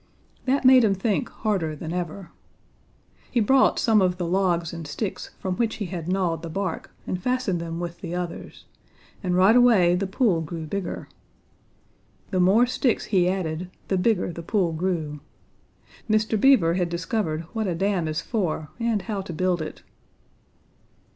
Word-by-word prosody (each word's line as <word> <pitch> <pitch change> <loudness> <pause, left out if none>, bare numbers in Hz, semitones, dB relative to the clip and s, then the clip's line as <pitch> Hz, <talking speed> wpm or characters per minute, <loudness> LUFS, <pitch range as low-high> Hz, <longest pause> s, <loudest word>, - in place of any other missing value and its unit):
That 270 +1 +1
made 255 -1 +8
him 200 -3 +3
think 215 +5 -1
harder 190 -8 -2
than 160 +2 -6
ever. 180 +1 -5 1.0
He 245 - +1
brought 260 +5 +4
some 220 -3 +4
of 180 -1 +1
the 175 - -2
logs 175 -2 +1
and 165 -2 -6
sticks 190 +8 -4
from 185 -1 -3
which 230 -2 0
he 210 - -4
had 175 -3 -5
gnawed 180 -3 0
the 165 - -6
bark 190 0 -3 0.2
and 185 - -3
fastened 250 -7 0
them 165 0 -5
with 175 0 -6
the 175 -1 -4
others, 180 -1 -6 0.6
and 180 -2 0
right 190 +5 +5
away 225 -8 +5
the 190 +2 0
pool 190 -4 +1
grew 160 +1 -5
bigger. 185 +2 -4 1.2
The 185 - +1
more 195 +7 +5
sticks 250 -1 0
he 180 -2 +4
added, 180 -2 -3 0.2
the 190 - +2
bigger 185 -3 +1
the 170 - -7
pool 175 -1 0
grew. 160 -3 -2 0.9
Mr. 215 0 +2
Beaver 235 -12 +5
had 175 -1 0
discovered 170 -1 -2
what 220 -2 -1
a 175 - -1
dam 190 -2 0
is 155 +1 -2
for 170 -9 -2
and 230 -4 0
how 210 -4 -3
to 190 - -7
build 180 0 0
it. 155 - -7
185 Hz, 165 wpm, -25 LUFS, 170-215 Hz, 1.2 s, made